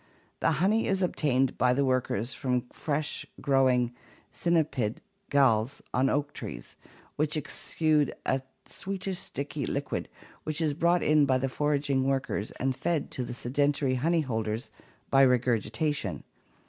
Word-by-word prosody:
The 165 Hz, -, +2 dB
honey 195 Hz, +9 st, +2 dB
is 190 Hz, -1 st, +1 dB
obtained 135 Hz, -7 st, +1 dB
by 125 Hz, 0 st, +4 dB
the 140 Hz, +1 st, +2 dB
workers 130 Hz, -2 st, 0 dB
from 125 Hz, -2 st, -1 dB
fresh 150 Hz, 0 st, -2 dB, 0.2 s
(growing) 130 Hz, -3 st, +3 dB, 0.4 s
cynipid 145 Hz, -10 st, +1 dB, 0.3 s
galls 130 Hz, -3 st, +3 dB
on 130 Hz, +2 st, +3 dB
oak 145 Hz, 0 st, 0 dB
trees, -, -, -7 dB, 0.4 s
which 150 Hz, +1 st, +1 dB
exude 155 Hz, 0 st, 0 dB
a 135 Hz, 0 st, +1 dB, 0.2 s
sweetish 190 Hz, -1 st, -4 dB
sticky 140 Hz, 0 st, -4 dB
liquid 140 Hz, +1 st, -3 dB, 0.3 s
which 155 Hz, 0 st, -1 dB
is 155 Hz, -3 st, +1 dB
brought 170 Hz, +3 st, +2 dB
in 150 Hz, -2 st, +4 dB
by 130 Hz, -1 st, +3 dB
the 135 Hz, +1 st, -1 dB
foraging 145 Hz, -1 st, +1 dB
workers 135 Hz, -6 st, -1 dB
and 130 Hz, 0 st, -2 dB
fed 150 Hz, +3 st, -1 dB
to 130 Hz, -, -2 dB
the 120 Hz, 0 st, -5 dB
sedentary 140 Hz, +2 st, +1 dB
honey 160 Hz, +6 st, +2 dB
holders 110 Hz, -3 st, -3 dB, 0.4 s
by 135 Hz, -, +6 dB
regurgitation. 120 Hz, -, +1 dB
135 Hz, 135 wpm, -28 LUFS, 125-150 Hz, 0.4 s, by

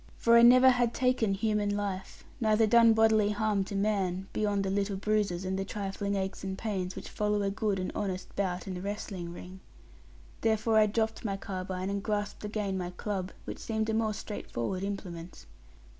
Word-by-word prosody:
For 235 Hz, 0 st, +4 dB
I 235 Hz, -, +8 dB
never 255 Hz, +2 st, +8 dB
had 245 Hz, -2 st, +1 dB
taken 250 Hz, -6 st, +2 dB
human 205 Hz, -1 st, 0 dB
life, 195 Hz, -2 st, -4 dB, 0.2 s
neither 220 Hz, -1 st, +3 dB
done 230 Hz, +1 st, +6 dB
bodily 220 Hz, -2 st, +4 dB
harm 210 Hz, -1 st, +1 dB
to 200 Hz, -, -6 dB
man; 195 Hz, -2 st, 0 dB
beyond 205 Hz, -2 st, 0 dB
the 190 Hz, -, -1 dB
little 200 Hz, 0 st, 0 dB
bruises, 200 Hz, -3 st, 0 dB
and 190 Hz, +1 st, -1 dB
the -, -, 0 dB
trifling 200 Hz, 0 st, -3 dB
aches 190 Hz, 0 st, -3 dB
and 190 Hz, 0 st, -4 dB
pains, 190 Hz, -4 st, -3 dB
which -, -, -7 dB
follow 210 Hz, -1 st, 0 dB
a 195 Hz, -, 0 dB
good 205 Hz, -1 st, -1 dB
and 185 Hz, 0 st, -3 dB
honest 185 Hz, -3 st, -4 dB
bout 185 Hz, -2 st, -1 dB
in 190 Hz, -, -4 dB
the 180 Hz, -, -5 dB
wrestling 195 Hz, -3 st, -5 dB
ring. 180 Hz, +2 st, -10 dB, 0.8 s
Therefore 220 Hz, 0 st, +3 dB
I 215 Hz, -, +5 dB
dropped 220 Hz, +1 st, -1 dB
my 200 Hz, -3 st, -2 dB
carbine, 185 Hz, -1 st, -4 dB
and 200 Hz, 0 st, -2 dB
grasped 205 Hz, 0 st, -3 dB
again 210 Hz, -2 st, -2 dB
my 175 Hz, -1 st, -3 dB
club, 190 Hz, 0 st, -4 dB
which -, -, -6 dB
seemed 220 Hz, -1 st, -1 dB
a -, -, -2 dB
more 220 Hz, -1 st, 0 dB
straight 210 Hz, 0 st, -7 dB
forward 150 Hz, +11 st, -2 dB
implement. 180 Hz, -, -6 dB
205 Hz, 190 wpm, -30 LUFS, 190-215 Hz, 0.8 s, I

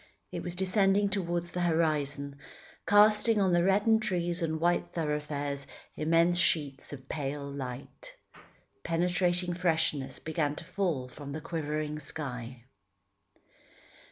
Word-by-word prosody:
It -, -, -4 dB
was 175 Hz, 0 st, -4 dB
descending 195 Hz, +2 st, +3 dB
towards 175 Hz, -3 st, -1 dB
the 180 Hz, -, -2 dB
horizon, 150 Hz, -4 st, 0 dB, 0.5 s
casting 210 Hz, +1 st, +5 dB
on 190 Hz, -3 st, +3 dB
the 175 Hz, 0 st, +4 dB
reddened 205 Hz, +4 st, +4 dB
trees 175 Hz, -3 st, -1 dB
and 160 Hz, -1 st, -1 dB
white 175 Hz, +2 st, +1 dB
thoroughfares 150 Hz, -3 st, -2 dB, 0.3 s
immense 165 Hz, +3 st, +3 dB
sheets 145 Hz, -6 st, 0 dB
of 135 Hz, -2 st, -9 dB
pale 140 Hz, -1 st, -3 dB
light. 140 Hz, -, -7 dB, 0.7 s
Penetrating 175 Hz, +1 st, +1 dB
freshness 160 Hz, -6 st, 0 dB
began 155 Hz, -2 st, -1 dB
to -, -, -8 dB
fall 170 Hz, -7 st, -1 dB
from 140 Hz, +2 st, -8 dB
the 155 Hz, -, -3 dB
quivering 150 Hz, -1 st, -3 dB
sky. 125 Hz, -6 st, -6 dB
165 Hz, 120 wpm, -30 LUFS, 145-180 Hz, 0.7 s, casting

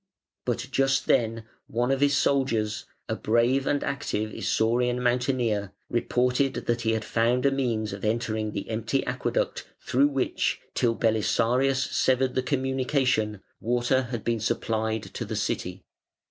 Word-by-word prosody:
But 120 Hz, 0 st, -1 dB
just 135 Hz, 0 st, +2 dB
then 115 Hz, -1 st, +1 dB, 0.2 s
one 120 Hz, +3 st, 0 dB
of 135 Hz, 0 st, 0 dB
his 145 Hz, 0 st, +4 dB
soldiers, 115 Hz, -6 st, +1 dB, 0.2 s
a -, -, -1 dB
brave 120 Hz, +5 st, +2 dB
and 145 Hz, -, +1 dB
active 110 Hz, -6 st, -2 dB
Isaurian 120 Hz, +2 st, +1 dB
mountaineer, 120 Hz, -5 st, 0 dB, 0.2 s
reported 125 Hz, +2 st, +1 dB
that 120 Hz, 0 st, 0 dB
he 115 Hz, -1 st, +1 dB
had 110 Hz, 0 st, -2 dB
found 120 Hz, +3 st, +1 dB
a 140 Hz, -, +5 dB
means 115 Hz, -6 st, -1 dB
of 100 Hz, -, -8 dB
entering 110 Hz, -1 st, -1 dB
the 100 Hz, -, -5 dB
empty 115 Hz, +4 st, -1 dB
aqueduct -, -, -2 dB
through 135 Hz, +3 st, +3 dB
which, 135 Hz, -3 st, 0 dB
till 115 Hz, -1 st, +1 dB
Belisarius 120 Hz, +4 st, +2 dB
severed 130 Hz, 0 st, +2 dB
the 130 Hz, -, +1 dB
communication, 130 Hz, -5 st, 0 dB, 0.2 s
water 120 Hz, +2 st, +1 dB
had 120 Hz, -3 st, -4 dB
been 115 Hz, -1 st, 0 dB
supplied 110 Hz, 0 st, -1 dB
to -, -, -6 dB
the -, -, -4 dB
city. -, -, -2 dB
120 Hz, 145 wpm, -26 LUFS, 110-130 Hz, 0.2 s, a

